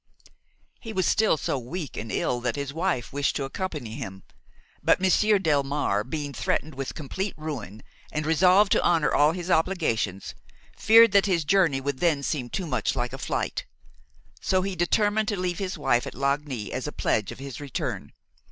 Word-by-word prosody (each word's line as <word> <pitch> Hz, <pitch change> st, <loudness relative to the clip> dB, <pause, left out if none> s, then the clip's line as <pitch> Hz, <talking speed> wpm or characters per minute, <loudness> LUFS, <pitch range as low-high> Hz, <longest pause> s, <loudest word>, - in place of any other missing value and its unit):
He 225 Hz, -2 st, -7 dB
was 185 Hz, -2 st, +1 dB
still 215 Hz, -7 st, +3 dB
so 140 Hz, -, -2 dB
weak 150 Hz, +5 st, -6 dB
and 110 Hz, +1 st, -5 dB
ill 120 Hz, -, 0 dB
that 120 Hz, -1 st, -1 dB
his 140 Hz, -1 st, -4 dB
wife 165 Hz, -8 st, -1 dB
wished 140 Hz, 0 st, 0 dB
to 140 Hz, -, -1 dB
accompany 140 Hz, -, -4 dB
him; 95 Hz, -4 st, -7 dB, 0.6 s
but -, -, +3 dB
Monsieur 205 Hz, +3 st, +4 dB
Delmare, 145 Hz, -, +1 dB
being 145 Hz, +3 st, -4 dB
threatened 155 Hz, +3 st, -1 dB
with 135 Hz, 0 st, -5 dB
complete 185 Hz, +6 st, -4 dB
ruin 125 Hz, -, -6 dB, 0.3 s
and 155 Hz, 0 st, -2 dB
resolved 185 Hz, +5 st, +4 dB
to -, -, +4 dB
honor 165 Hz, -3 st, +2 dB
all 150 Hz, +2 st, +4 dB
his 180 Hz, 0 st, -4 dB
obligations, 155 Hz, -, 0 dB, 0.4 s
feared 225 Hz, +1 st, +7 dB
that 200 Hz, 0 st, +4 dB
his 170 Hz, -5 st, +1 dB
journey 170 Hz, -6 st, +3 dB
would 135 Hz, -1 st, -3 dB
then 160 Hz, -5 st, +2 dB
seem 135 Hz, -4 st, -2 dB
too 190 Hz, +6 st, -3 dB
much 155 Hz, -, -1 dB
like 125 Hz, 0 st, -2 dB
a 135 Hz, -, -6 dB
flight; -, -, -3 dB, 0.7 s
so 185 Hz, -1 st, +1 dB
he 195 Hz, -1 st, -3 dB
determined 205 Hz, +4 st, +1 dB
to 205 Hz, -, -1 dB
leave 180 Hz, -2 st, -2 dB
his 190 Hz, -1 st, -3 dB
wife 120 Hz, 0 st, +1 dB
at -, -, -7 dB
Lagny 140 Hz, -4 st, -2 dB
as 130 Hz, +3 st, -3 dB
a -, -, -3 dB
pledge 105 Hz, -7 st, 0 dB
of -, -, -9 dB
his 135 Hz, 0 st, -8 dB
return. 140 Hz, -3 st, -4 dB
150 Hz, 180 wpm, -26 LUFS, 135-185 Hz, 0.7 s, feared